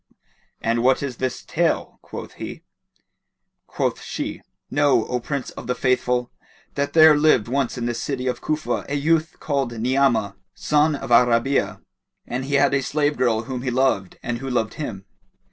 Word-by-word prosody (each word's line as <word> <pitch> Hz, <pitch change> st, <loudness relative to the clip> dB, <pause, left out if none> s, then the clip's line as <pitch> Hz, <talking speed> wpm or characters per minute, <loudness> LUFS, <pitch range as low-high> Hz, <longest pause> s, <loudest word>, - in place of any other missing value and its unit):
"And 115 Hz, +1 st, +1 dB
what 130 Hz, +3 st, +3 dB
is 130 Hz, -4 st, -4 dB
this 130 Hz, -1 st, -3 dB
tale?" -, -, -1 dB
quoth -, -, -8 dB
he. -, -, -7 dB, 1.0 s
Quoth -, -, -2 dB
she -, -, -5 dB, 0.3 s
"Know, 145 Hz, -5 st, +3 dB
O 125 Hz, -, -2 dB
Prince 140 Hz, +2 st, -4 dB
of -, -, -9 dB
the 125 Hz, -, 0 dB
Faithful 125 Hz, -1 st, 0 dB, 0.4 s
that 140 Hz, 0 st, -2 dB
there 160 Hz, -1 st, +8 dB
lived 145 Hz, -7 st, +3 dB
once 130 Hz, 0 st, -1 dB
in 120 Hz, -, -2 dB
the 120 Hz, -, -1 dB
city 130 Hz, +2 st, -3 dB
of 125 Hz, -, -2 dB
Cufa 155 Hz, 0 st, -1 dB
a 145 Hz, -, -1 dB
youth 160 Hz, +3 st, +1 dB
called 135 Hz, -5 st, -1 dB
Ni'amah, 120 Hz, -5 st, +1 dB, 0.2 s
son 150 Hz, 0 st, +2 dB
of 135 Hz, -, -6 dB
Al 120 Hz, +1 st, +7 dB
Rabi'a, 120 Hz, +4 st, +1 dB, 0.4 s
and 130 Hz, +2 st, -3 dB
he 140 Hz, +1 st, -1 dB
had 140 Hz, 0 st, +4 dB
a 135 Hz, -, +2 dB
slave 145 Hz, +2 st, 0 dB
girl 115 Hz, -3 st, +1 dB
whom 125 Hz, +1 st, -5 dB
he 130 Hz, -, -2 dB
loved 125 Hz, -7 st, 0 dB
and 120 Hz, -1 st, -3 dB
who 135 Hz, +1 st, -5 dB
loved 120 Hz, -4 st, 0 dB
him. 100 Hz, -11 st, -6 dB
130 Hz, 175 wpm, -22 LUFS, 120-140 Hz, 1.0 s, there